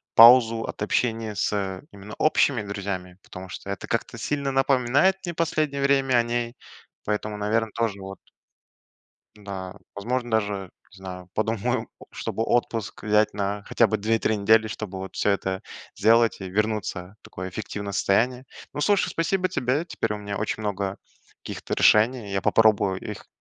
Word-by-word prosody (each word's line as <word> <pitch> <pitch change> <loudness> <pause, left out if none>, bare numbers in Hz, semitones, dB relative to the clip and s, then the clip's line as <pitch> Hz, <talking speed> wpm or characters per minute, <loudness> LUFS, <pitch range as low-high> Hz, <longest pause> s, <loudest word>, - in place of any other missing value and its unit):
паузу 115 -1 +8
от - - -7
общения 110 0 0
с 95 -3 -1
именно 100 +1 -11
общими 140 -6 +3
друзьями, 100 -3 -5
потому 95 0 -10
что 95 - -8
это 100 - -6
как-то - - -2
сильно 140 -2 -1
напоминает 135 +6 +3
мне 175 - -3
последнее 155 -4 0
время 135 -2 +3
о 115 - +3
ней, 120 0 -2 0.5
поэтому, 105 0 -2
наверное, 110 +2 0
тоже, 110 -4 -2
вот 95 0 -8 1.3
Да, 95 -2 -6 0.2
возможно 120 +4 -2
даже, 100 -4 -1 0.2
не - - -16
знаю, 90 -1 -8
подумаю, 110 -1 -1 0.2
чтобы 110 - -3
отпуск 115 -2 -1
взять 105 0 +2
на 100 0 -2
хотя 115 - +3
бы 110 0 -1
2-3 110 +1 +1
недели, 110 +2 +4
чтобы 95 -3 -6
всё - - +1
это 95 -1 -1 0.3
сделать 115 +2 +3
и 95 - -5
вернуться 105 -2 -2
в - - -71
такое 95 +1 -7
эффективное 100 0 -5
состояние. 125 +7 +1 0.3
Ну, - - -4
слушай, 205 +5 +3
спасибо 185 +3 0
тебе, 145 -1 0
теперь 115 -10 -2
у - - -5
меня 100 -1 -5
очень 110 +1 -2
много 100 -1 -2 0.5
каких-то - - -5
решений, 110 -1 +4
я 95 - 0
попробую 100 -2 +3
их - - -8
110 Hz, 155 wpm, -25 LUFS, 100-120 Hz, 1.3 s, паузу